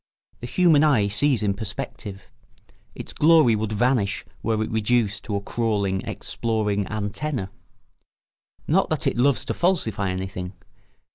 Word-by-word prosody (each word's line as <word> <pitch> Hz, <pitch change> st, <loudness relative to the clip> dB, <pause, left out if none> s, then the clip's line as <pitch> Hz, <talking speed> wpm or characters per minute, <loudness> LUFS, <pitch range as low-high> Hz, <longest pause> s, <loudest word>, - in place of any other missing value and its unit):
The 120 Hz, -, -6 dB
human 160 Hz, 0 st, +4 dB
eye 130 Hz, -10 st, +4 dB
sees 120 Hz, +4 st, +1 dB
in 100 Hz, -1 st, +1 dB
perspective; 105 Hz, -1 st, -6 dB, 0.7 s
its -, -, -8 dB
glory 155 Hz, -7 st, +5 dB
would 110 Hz, 0 st, -2 dB
vanish 110 Hz, -2 st, +1 dB, 0.2 s
were 110 Hz, -1 st, 0 dB
it -, -, -5 dB
reduced 110 Hz, -2 st, +1 dB
to 105 Hz, -, -3 dB
a 100 Hz, -, -1 dB
crawling, 100 Hz, -3 st, -1 dB
exploring 105 Hz, -3 st, -2 dB
antenna. 110 Hz, +1 st, -3 dB, 1.2 s
Not -, -, +2 dB
that -, -, -1 dB
it -, -, +1 dB
loves 130 Hz, +1 st, +2 dB
to -, -, -2 dB
falsify 110 Hz, -, 0 dB
anything. 95 Hz, 0 st, -4 dB
110 Hz, 135 wpm, -24 LUFS, 100-125 Hz, 1.2 s, glory